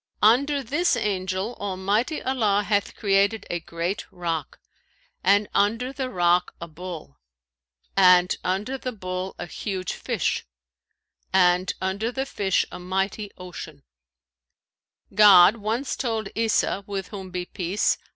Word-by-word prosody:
Under 275 +6 +4
this 295 +4 +1
Angel 190 0 -2
Almighty 205 - -1
Allah 215 -6 +1
hath 205 -1 0
created 200 +1 +2
a 175 - -1
great 170 +4 -3
rock, 170 -4 -4 0.6
and 200 +2 +4
under 230 +6 +1
the 260 -1 -3
rock 175 -3 +2
a 170 - -6
bull, 160 - -9 0.8
and 180 -2 +6
under 205 +9 -2
the 255 -1 -4
bull 185 -2 -5
a - - -5
huge 185 +1 -4
fish, - - -1 0.9
and 180 0 +3
under 200 +5 -2
the 265 +2 -2
fish 195 -8 0
a 180 - -7
mighty 195 +3 -2
ocean.[FN#532] 65 - -15
God 200 0 +8
once 225 +6 -2
told 225 -5 -2
Isa 220 -2 +1
(with 195 -2 -4
whom 190 -3 -7
be 180 0 -4
peace! 185 +2 0
195 Hz, 125 wpm, -24 LUFS, 180-220 Hz, 0.9 s, God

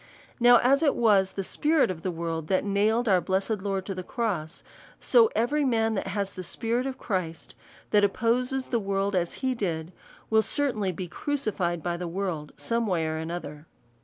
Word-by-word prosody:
•Now 240 0 +8
as 275 +4 +4
it 295 -4 +3
was 200 -5 +3
the 195 - -3
spirit 300 - +2
of 165 -3 -7
the 185 - -2
world 165 -2 -3
that 185 - +1
nailed 215 +4 +1
our 185 -3 +4
blessed 195 +3 -1
Lord 195 -1 -2
to 195 - -3
the 185 - -5
cross; 180 -6 -3 0.4
so 460 -2 +5
every 290 +6 +1
man 225 -4 +2
that 195 - -2
has 195 0 -2
the 185 - -6
spirit 235 +7 -2
of 265 - -5
Christ, 180 -6 -4 0.4
that 210 -1 +4
opposes 250 +5 +1
the 235 - +1
world, 195 0 -1
as 175 -2 0
he 260 - +2
did, 175 -6 -3 0.4
will 220 0 +5
certainly 220 -7 0
be 180 +1 -6
crucified 190 - -2
by 175 -1 -1
the 175 0 -4
world 170 -4 -3
some 230 -1 -1
way 170 -5 0
or 160 0 -2
other. 155 -3 -7
200 Hz, 190 wpm, -27 LUFS, 175-235 Hz, 0.4 s, Now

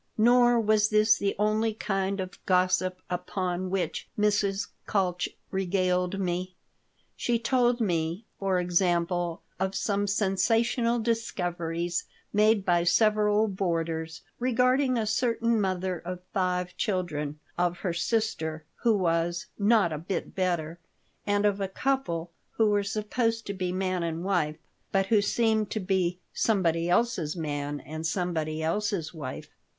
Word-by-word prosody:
Nor 240 +1 +5
was 215 -1 +3
this 215 +1 +5
the 200 0 0
only 215 +1 +1
kind 195 -2 -1
of 185 0 -6
gossip 185 0 +2
upon 180 0 -2
which 190 -1 -2
Mrs. 205 -1 +1 0.2
Kalch 180 -3 0 0.2
regaled 185 0 0
me. 180 0 -2 0.6
She 240 -1 0
told 240 +1 +2
me, 175 -1 -1
for 195 -2 +1
example, 175 -1 0 0.2
of 190 0 -1
some 200 +1 0
sensational 225 +4 +2
discoveries 175 -7 -2 0.3
made 210 -1 +4
by 175 -2 +3
several 210 +3 +3
boarders 165 -4 -2 0.2
regarding 255 +1 +2
a 225 - 0
certain 230 0 +1
mother 185 -2 -1
of 180 +2 -6
five 180 -1 0
children, 155 -7 -2 0.2
of 175 0 0
her 180 -4 -1
sister 170 -5 -1
who 230 -3 +2
was 170 -1 0
"not 205 -5 +4
a 150 - -3
bit 170 +2 -4
better," 175 -3 -1 0.5
and 205 0 +2
of 205 -1 +1
a 195 - 0
couple 190 -7 -1 0.2
who 220 -2 +3
were 205 0 +3
supposed 225 +3 -1
to 200 - -3
be 185 -2 -2
man 185 -1 -1
and 165 0 -3
wife, 170 -6 0 0.3
but 195 -1 +2
who 210 +1 +3
seemed 220 0 +1
to 220 - -2
be 185 -2 0 0.2
"somebody 170 -6 +1
else's 180 -6 +1
man 145 -3 -3
and 155 +4 -5
somebody 160 -3 -2
else's 175 -1 -1
wife." 145 -6 -7
190 Hz, 135 wpm, -28 LUFS, 175-215 Hz, 0.6 s, Nor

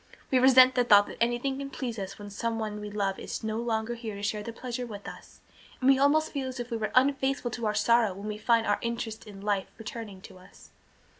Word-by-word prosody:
We 260 - +4
resent 260 0 +7
the 250 -1 +3
thought 205 -4 +6
that - - -10
anything 240 +3 0
can 275 0 -5
please 240 -5 -5
us 195 0 -6
when 205 -1 -9
someone 220 0 -3
we 210 - -6
love 200 -2 -2
is - - -6
no 220 0 -2
longer 230 0 -1
here 230 -3 -6
to 200 - -8
share 210 +1 -1
the 230 - -6
pleasure 245 +1 -5
with 205 -3 -9
us, - - -11 0.4
and 255 - 0
we 270 - +3
almost 305 +3 +3
feel 275 -3 -3
as 255 -1 -6
if 240 0 -5
we 230 - -1
were 215 -1 -3
unfaithful 270 -1 +2
to 230 -1 -3
our 210 - -1
sorrow 230 0 +3
when 200 +2 -7
we 210 0 -4
find 230 +1 +3
our 205 - +1
interest 230 -2 -4
in 200 -2 -10
life 200 -2 -1
returning 220 -3 -7
to 190 -1 -13
us." 185 - -18
230 Hz, 240 wpm, -28 LUFS, 210-250 Hz, 0.4 s, resent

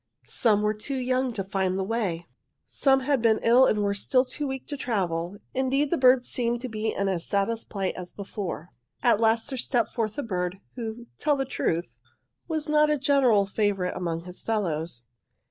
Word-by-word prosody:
Some 210 -3 +2
were 210 0 +2
too 265 +6 -4
young 255 0 0
to 195 - -2
find 190 -1 -1
the 190 - 0
way. 190 -6 -2 0.4
"'Some 270 -1 +2
had 270 -1 +1
been 225 -1 +4
ill 245 +3 +6
and 210 -1 +1
were 200 0 +1
still 255 +6 +2
too 290 +3 -3
weak 265 -1 -5
to 290 - -3
travel. 190 -8 -2 0.2
Indeed, 270 +2 +1
the 340 - +2
birds 255 -1 +5
seemed 240 -1 0
to 255 - -3
be 220 0 -2
in 200 - -1
as 180 -3 -1
sad 200 +4 +1
a 230 - -2
plight 195 -4 -3
as 180 -1 -7
before. 195 -4 -6 0.3
"'At 235 -4 +4
last 225 +2 +2
there 265 - -3
stepped 235 -1 0
forth 215 -3 -2
a 290 - -1
bird, 180 -3 -2
who, 235 -1 -6
truth 295 -1 +2
to 270 - -1
tell, 165 +1 +1 0.7
was 315 -2 -2
not 300 0 +4
a 300 - +2
general 260 -7 +4
favourite 195 -2 0
among 170 -2 -3
his 180 0 -9
fellows. 165 - -2
225 Hz, 195 wpm, -26 LUFS, 195-260 Hz, 0.7 s, ill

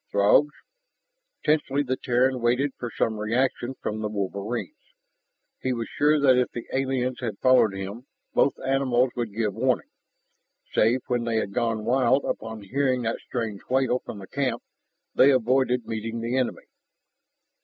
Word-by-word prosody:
Throgs? 100 +9 +4 1.0
Tensely 145 -2 +2
the 130 -1 -1
Terran 125 0 +1
waited 125 +4 +2
for 120 - -4
some 110 -1 -1
reaction 120 +3 0
from 110 0 -2
the 105 -1 -2
wolverines. 105 - -5 0.7
He 130 - 0
was 115 -2 -3
sure 150 +1 +3
that 130 -3 +5
if 125 - +1
the 120 - -7
aliens 130 -1 -1
had 110 -5 -4
followed 130 -6 +4
him, 100 +7 -6 0.3
both 140 - +2
animals 130 -2 +2
would 120 -3 -3
give 105 -1 -1
warning. - - 0 0.8
Save 120 +4 +3
when 120 -1 -1
they 115 -1 -1
had 100 -3 -1
gone 115 -2 -1
wild 130 +3 +3
upon 110 -1 -4
hearing 130 +3 0
that 115 0 -2
strange 110 -5 -4
wail 130 -1 +2
from - - -7
the 95 -1 -10
camp, 135 +2 -2 0.5
they 135 - +6
avoided 130 -1 +2
meeting 115 +1 -4
the 115 +2 -2
enemy. 130 -2 -1
125 Hz, 155 wpm, -25 LUFS, 110-130 Hz, 1.0 s, they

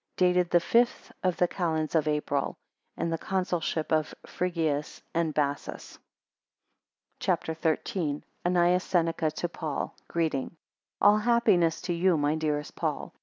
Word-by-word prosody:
9 180 -1 +5
Dated 180 -1 +2
the 175 - +5
fifth 235 +7 +1
of 185 -2 0
the 180 - +3
calends 160 -4 -1
of 160 -2 +2
April, 150 -2 -1 0.4
in 170 - -1
the 165 - -1
Consulship 180 -4 -1
of 155 -1 +1
Frigius 160 -5 -2
and 165 -1 +1
Bassus. 145 -1 -3 1.2
CHAPTER 160 - 0
XIII. 160 -1 -1 0.2
ANNAEUS 180 +1 +3
SENECA 165 -2 +1
to 175 - -1
PAUL 160 -4 -4
Greeting. 160 -3 -1 0.5
ALL 205 +1 +6
happiness 210 -8 +3
to 175 - -2
you, 175 0 +3
my 145 0 +2
dearest 150 -2 -2
Paul. - - -3
165 Hz, 135 wpm, -28 LUFS, 155-180 Hz, 1.2 s, ALL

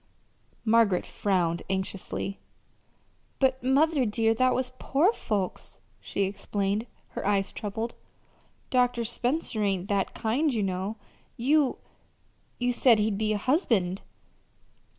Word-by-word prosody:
Margaret 220 -5 +4
frowned 175 -4 0
anxiously. 190 +1 -3 1.0
"But, 265 -1 +2
mother, 280 +3 +3
dear, 225 0 +2
that 255 +2 +2
was 255 0 -1
poor 330 +11 +3
folks," 200 - -3 0.2
she 200 - -2
explained, 200 +2 -2 0.2
her - - -5
eyes 200 -1 +1
troubled. 220 +2 -4 0.8
"Dr. 245 -2 +2
Spencer 245 0 -2
ain't 195 -2 0
that 200 -2 0
kind, 255 +7 +1
you 220 -5 0
know. 190 +3 -2 0.4
You 280 +2 +2 0.8
you 245 0 0
said 240 -2 +5
he'd 210 -1 0
be 215 0 +1
a - - 0
husband." 205 - +1
220 Hz, 115 wpm, -27 LUFS, 195-255 Hz, 1.0 s, said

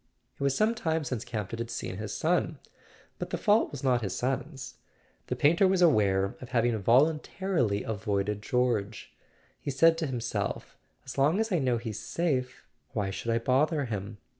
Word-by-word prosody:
It - - -18
was 140 -1 +1
some 220 +2 +3
time 160 -7 -1
since 125 -5 -3
Campton 115 -2 -5
had 115 0 -3
seen 105 -5 -5
his 105 -1 -5
son; 160 +1 0 0.6
but - - -4
the - - -2
fault 210 +2 +3
was 140 -2 -7
not 125 -3 +2
his 95 -3 -3
son's. 135 - -3 0.5
The - - -1
painter 170 +6 +4
was 185 -1 +3
aware 100 - +3
of 125 - -9
having 120 -2 +2
voluntarily 135 - +2
avoided 105 -1 -2
George. 115 -2 -1 0.5
He - - -5
said 165 +4 +4
to 160 - -1
him¬ 130 -3 -3
self: 110 -3 -3 0.3
"As 130 +1 -6
long 150 +8 +3
as 225 0 0
I 175 - +2
know 125 -4 +1
he's 110 -3 -5
safe 130 -7 -2 0.3
why 100 -3 -1
should 115 - -5
I 115 - +2
bother 140 +5 +2
him?" 105 -2 -5
125 Hz, 180 wpm, -29 LUFS, 110-155 Hz, 0.6 s, painter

